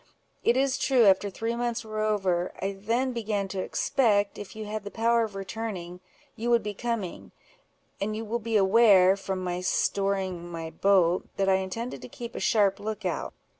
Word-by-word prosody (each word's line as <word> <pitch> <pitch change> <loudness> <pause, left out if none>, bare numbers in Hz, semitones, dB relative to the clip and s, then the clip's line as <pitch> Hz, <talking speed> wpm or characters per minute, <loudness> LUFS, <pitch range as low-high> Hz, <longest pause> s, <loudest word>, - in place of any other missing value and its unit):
It 235 - +3
is 270 0 +1
true, 255 -4 +4
after 195 +1 +4
three 225 +4 -3
months 240 -1 -2
were 215 0 -3
over, 190 -5 0
I 195 +1 -1
then 230 +6 -1
began 210 -4 -2
to 190 - -4
expect, 205 -2 +1
if 205 - -9
you 215 0 -6
had 215 0 -4
the 205 - -6
power 230 +2 +2
of 215 -3 -5
returning, 195 -3 -5 0.4
you 235 0 -3
would 235 -2 +4
be 210 0 -3
coming; 220 -4 -4 0.7
and 215 +2 -1
you 225 +1 -4
will 230 +3 -2
be 225 -1 0
aware, 195 -2 +6
from 190 -1 -4
my 180 0 -2
storing 190 -2 -1
my 165 -1 -5
boat, 185 -2 +3
that 195 -1 +1
I 190 0 +4
intended 210 +6 -4
to - - -9
keep 235 0 -8
a - - -5
sharp 200 -3 +2
look 215 +1 -5
out. - - -2
205 Hz, 190 wpm, -27 LUFS, 190-230 Hz, 0.7 s, aware